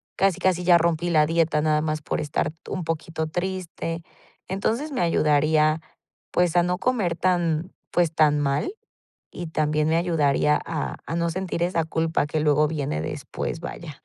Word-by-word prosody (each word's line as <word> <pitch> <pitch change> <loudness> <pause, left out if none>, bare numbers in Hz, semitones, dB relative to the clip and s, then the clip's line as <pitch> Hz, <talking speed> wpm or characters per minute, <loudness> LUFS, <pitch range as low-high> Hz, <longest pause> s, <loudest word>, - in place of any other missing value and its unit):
casi 195 -3 +2
casi 180 -2 +1
ya 175 -1 +6
rompí 170 +1 +1
la 150 -2 +4
dieta 165 -2 +2
nada 155 0 +2
más 155 -1 -2
por - - -2
estar 150 0 -1
t 160 - -14
un 185 - -2
poquito 160 0 -3
triste". 175 -1 -4 0.5
Entonces, 225 +10 -1
me 260 - -1
ayudaría, 155 -1 +3 0.5
pues, 180 -1 +2
a 175 - +5
no 180 +1 -1
comer 215 -10 0
tan, 175 -1 0 0.2
pues, 175 -2 +2
tan 150 -2 +4
mal 145 - 0 0.6
y 175 -2 -6
también 155 -1 +1
me 160 - +3
ayudaría 150 -3 +2
a 160 -3 -3
a 165 - -3
no 170 0 0
sentir 175 -1 -2
esa 175 -2 +1
culpa 160 -1 0
que 155 +1 -2
luego 150 0 +3
viene 140 - -2
después, 80 - -4
vaya. - - -8
165 Hz, 170 wpm, -24 LUFS, 155-175 Hz, 0.6 s, ya